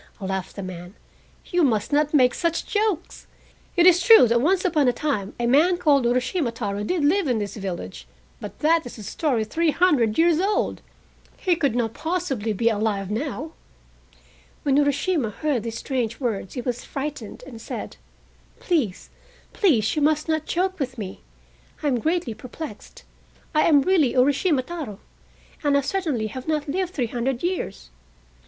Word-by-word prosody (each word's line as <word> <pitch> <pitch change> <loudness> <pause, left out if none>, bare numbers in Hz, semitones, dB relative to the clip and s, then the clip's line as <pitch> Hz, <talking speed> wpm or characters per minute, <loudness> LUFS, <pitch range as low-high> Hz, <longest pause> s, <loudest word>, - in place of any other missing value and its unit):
laughed 190 -1 -4
the 200 - -6
man, 180 +1 -8 0.6
"you 355 -1 +2
must 225 -2 +1
not 300 0 +2
make 255 -5 +4
such 335 -2 -1
jokes. 415 -5 -2 0.5
It 345 - +5
is 360 -1 +7
true 445 - +8
that 235 0 +3
once 370 +6 +2
upon 305 -6 +2
a - - +5
time 235 -8 -2
a 240 - 0
man 310 +9 +4
called 280 -7 +3
Urashima 250 +3 0
Taro 205 -3 -3
did 310 +6 0
live 355 +3 +2
in 245 -3 +1
this 205 -2 -4
village, 175 - -6 0.3
but 210 - -8
that 325 +2 +3
is 245 - -10
a 215 - -9
story 245 - -1
three 330 +9 0
hundred 290 -10 +2
years 330 -1 +4
old. 400 +3 0 0.6
He 365 -3 +1
could 280 -8 0
not 230 -2 0
possibly 315 - -2
be 220 +3 0
alive 205 -3 0
now!" 280 +5 -3 1.1
When 275 -2 +2
Urashima 285 - +1
heard 270 +3 -1
these 230 0 -5
strange 235 -4 -2
words 225 -7 -3
he 250 - -2
was 245 0 -3
frightened, 275 -6 -6
and 235 -5 -10
said: - - -6 0.6
"Please, 270 - -1 0.4
please, 240 - +2
you 305 - 0
must 305 +1 +2
not 315 -1 -1
joke 370 +1 -1
with 260 -2 -3
me, 195 -3 -6 0.6
I - - +1
am 250 -3 +1
greatly 320 -3 -1
perplexed. 255 0 -9 0.5
I 305 - +3
am 290 -4 +5
really 320 -9 +2
Urashima 280 +2 +3
Taro, 295 - -6 0.6
and 285 -1 +3
I - - +2
certainly 290 - -1
have 255 +6 -7
not 305 -2 -1
lived 360 +4 -1
three 255 - 0
hundred 240 +3 -2
years. 65 - -3
275 Hz, 170 wpm, -24 LUFS, 225-325 Hz, 1.1 s, true